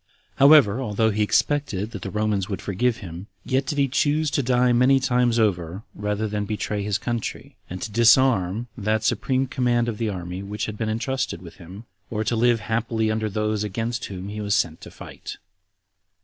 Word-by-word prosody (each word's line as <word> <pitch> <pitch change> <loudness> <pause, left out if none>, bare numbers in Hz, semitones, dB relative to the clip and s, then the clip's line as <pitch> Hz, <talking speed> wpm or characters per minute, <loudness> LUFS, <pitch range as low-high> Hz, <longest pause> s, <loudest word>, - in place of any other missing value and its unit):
However, 135 -5 +6
although 110 -2 +1
he 105 +1 -1
expected 105 0 0
that 100 -6 -7
the 95 - -5
Romans 105 -1 -1
would 100 - -3
forgive 115 +4 0
him, 90 +3 -8 0.2
yet 135 +1 0
did 145 - -2
he 140 -1 +3
choose 145 +3 +1
to - - +1
die 125 -1 +2
many 130 +3 +4
times 125 -2 +2
over, 95 -3 0
rather 105 +1 -2
than 105 0 -2
to - - -12
betray 105 -1 -2
his 100 0 0
country, 120 +2 -4
and 90 +1 -6
to 110 - -5
dishonor 115 -3 +4
that 110 0 -1
supreme 130 +4 +1
command 120 -2 0
of 110 -3 -4
the 115 -2 0
army 90 -1 -5
which 100 +2 -4
had 105 - -5
been 110 0 -2
intrusted 130 0 -2
with 85 - -12
him, 95 +5 -11 0.2
or 110 -1 -2
to 110 +2 0
live 120 0 +3
happily 110 0 -1
under 110 0 -1
those 105 0 -1
against 115 +5 -3
whom 95 0 -7
he 105 +1 -5
was 105 -1 +1
sent 80 -2 -1
to - - -10
fight. - - -9
110 Hz, 195 wpm, -23 LUFS, 100-125 Hz, 0.2 s, However